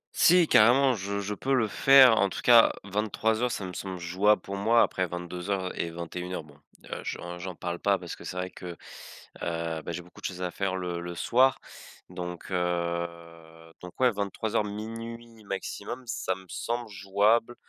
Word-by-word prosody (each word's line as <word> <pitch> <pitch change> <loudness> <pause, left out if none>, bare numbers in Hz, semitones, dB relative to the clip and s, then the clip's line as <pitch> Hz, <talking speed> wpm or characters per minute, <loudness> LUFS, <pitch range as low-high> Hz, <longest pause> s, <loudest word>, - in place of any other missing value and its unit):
Si, 175 -1 +6
carrément, 130 +4 +6
je 100 -1 -3
je 105 +1 -3
peux 135 +6 0
le 115 -4 +2
faire. 130 0 +7
En 100 -1 +3
tout - - -6
cas, 120 -2 +7
23:00, 110 +3 0
ça 95 - -3
me 90 - -7
semble 95 0 -5
jouable 95 +5 +2
pour 100 - -5
moi. 115 +4 +4
Après 95 -1 -1
22:00 90 +2 -4
et 85 - -1
21:00, 85 +1 -5
bon, 75 -2 -17 0.4
heu, - - -4
j'en 90 0 -6
j'en 90 -1 -6
parle 85 0 -4
pas 100 -1 +2
parce 90 -2 -7
que - - -13
c'est 90 - -6
vrai 90 0 -3
que, 90 - -10 0.8
heu, 85 -1 -2
ben, - - -5
j'ai 90 - -4
beaucoup 90 - -16
de - - -8
choses 90 -1 -6
à 90 - -2
faire 95 0 -2
le 90 -2 -3
le 85 0 -6
soir 130 +9 +3 0.5
donc, 90 0 -7
heu, 85 -2 -4
donc 90 +4 -11
ouais, 125 -2 +5
23:00, 105 +2 -1
00:00 115 +2 -7
maximum, 100 +5 -5
ça 95 -4 -2
me 95 0 -14
semble 120 -1 -3
jouable, 105 +5 +1
95 Hz, 185 wpm, -28 LUFS, 90-110 Hz, 0.8 s, faire